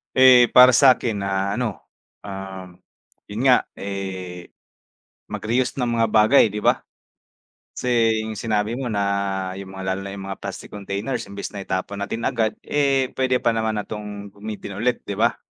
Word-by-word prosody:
Eh, 130 Hz, -2 st, +8 dB
para 125 Hz, 0 st, +9 dB
sa 130 Hz, +1 st, +6 dB
'kin 110 Hz, -4 st, -3 dB
na 100 Hz, +2 st, -1 dB
ano, 115 Hz, -6 st, -3 dB, 0.4 s
ah 95 Hz, -2 st, -7 dB, 0.6 s
yun 105 Hz, +3 st, -5 dB
nga 130 Hz, -2 st, +4 dB
eh 95 Hz, -3 st, -6 dB, 0.8 s
mag-reuse 120 Hz, +4 st, -1 dB
ng 120 Hz, -3 st, -1 dB
mga 115 Hz, -, +3 dB
bagay 110 Hz, +5 st, +5 dB
'di 105 Hz, 0 st, -5 dB
ba, -, -, +3 dB, 1.0 s
kase 120 Hz, -2 st, +2 dB, 0.2 s
sinabi 105 Hz, +1 st, -1 dB
mo 125 Hz, -1 st, -3 dB
na 100 Hz, -2 st, -1 dB
yung 95 Hz, 0 st, -8 dB
mga 95 Hz, 0 st, -3 dB
lalo 95 Hz, -, -5 dB
na 100 Hz, -, -6 dB
yung 95 Hz, -1 st, -7 dB
mga 95 Hz, -, -6 dB
plastic -, -, -7 dB
containers 105 Hz, +3 st, -4 dB
imbis 100 Hz, 0 st, -6 dB
na 100 Hz, -, -5 dB
itapon 95 Hz, +2 st, -3 dB
natin 115 Hz, +3 st, -3 dB
agad, 110 Hz, -3 st, 0 dB
eh, 135 Hz, -3 st, +1 dB
puwede 130 Hz, -1 st, +1 dB
pa 120 Hz, -2 st, +1 dB
naman 110 Hz, -1 st, -1 dB
na 105 Hz, -, -4 dB
'tong 105 Hz, -1 st, -7 dB
gamitin 105 Hz, -1 st, -7 dB
ulit 125 Hz, 0 st, +1 dB
'di 100 Hz, -, -3 dB
ba? 115 Hz, +4 st, +1 dB
105 Hz, 165 wpm, -22 LUFS, 100-120 Hz, 1.0 s, para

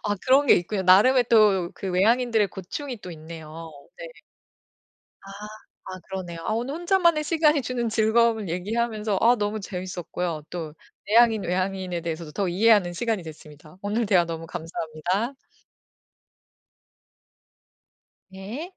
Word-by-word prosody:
아 205 Hz, 0 st, 0 dB
그런 270 Hz, +2 st, +4 dB
게 -, -, +7 dB
있군요. 190 Hz, +3 st, -1 dB
나름의 215 Hz, +8 st, +5 dB
또 200 Hz, -6 st, +4 dB
그 195 Hz, -, -6 dB
외향인들의 220 Hz, +3 st, +2 dB
고충이 240 Hz, -, -7 dB
또 180 Hz, -, -9 dB
있네요. 160 Hz, 0 st, -10 dB, 0.3 s
네. -, -, -7 dB, 1.2 s
아. 195 Hz, -, -12 dB, 0.5 s
아 185 Hz, -, -8 dB
그러네요. 185 Hz, -3 st, -6 dB
아 -, -, -1 dB
오늘 245 Hz, +5 st, -3 dB
혼자만의 340 Hz, -2 st, +2 dB
시간이 305 Hz, -2 st, +2 dB
주는 245 Hz, -2 st, -2 dB
즐거움을 220 Hz, -1 st, +2 dB
얘기하면서 210 Hz, +3 st, -2 dB
아 240 Hz, +2 st, +5 dB
너무 210 Hz, -1 st, -2 dB
재밌었고요. 180 Hz, -4 st, -5 dB
또 160 Hz, -4 st, -6 dB, 0.3 s
내향인, 225 Hz, -1 st, +4 dB
외향인에 185 Hz, -1 st, -2 dB
대해서도 165 Hz, -1 st, -5 dB
더 195 Hz, +5 st, -2 dB
이해하는 195 Hz, -1 st, +3 dB
시간이 215 Hz, 0 st, -2 dB
됐습니다. 155 Hz, 0 st, -13 dB
오늘 210 Hz, +3 st, -1 dB
대화 180 Hz, -3 st, +4 dB
너무 165 Hz, -1 st, -6 dB
감사합니다. 175 Hz, -, -3 dB, 3.0 s
네. 215 Hz, -, -7 dB
200 Hz, 305 characters per minute, -24 LUFS, 175-235 Hz, 3.0 s, 게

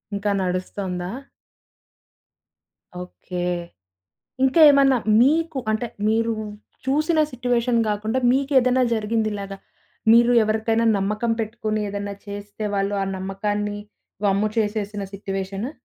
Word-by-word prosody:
ఇంకా 200 Hz, +1 st, -1 dB
నడుస్తోందా? 180 Hz, 0 st, -3 dB, 1.9 s
ఓకే. 180 Hz, 0 st, -7 dB, 1.0 s
ఇంకా 265 Hz, +5 st, +3 dB
ఏమన్నా 275 Hz, -2 st, +5 dB, 0.2 s
మీకు 315 Hz, +3 st, +2 dB
అంటే 220 Hz, +3 st, -1 dB, 0.2 s
మీరు 230 Hz, +1 st, +1 dB, 0.5 s
చూసిన 310 Hz, +4 st, +1 dB
సిట్యుయేషన్ 245 Hz, -1 st, 0 dB
గాకుండా 215 Hz, +4 st, -1 dB
మీకేదైనా 260 Hz, -1 st, +3 dB
జరిగిందిలాగా. 210 Hz, -2 st, -2 dB, 0.6 s
మీరు 235 Hz, +1 st, +6 dB
ఎవరికైనా 220 Hz, +1 st, +1 dB
నమ్మకం 210 Hz, +4 st, -1 dB
పెట్టుకొని, 215 Hz, -1 st, -2 dB
ఏదైనా 200 Hz, 0 st, -4 dB
చేస్తే, 205 Hz, +1 st, -7 dB
వాళ్ళు 200 Hz, +1 st, 0 dB
ఆ -, -, 0 dB
నమ్మకాన్ని 205 Hz, +2 st, -3 dB, 0.5 s
వమ్ము 200 Hz, +2 st, +2 dB
చేసేసిన 210 Hz, -2 st, -1 dB
సిట్యుయేషను? 195 Hz, +3 st, -4 dB
215 Hz, 95 wpm, -23 LUFS, 200-240 Hz, 1.9 s, మీరు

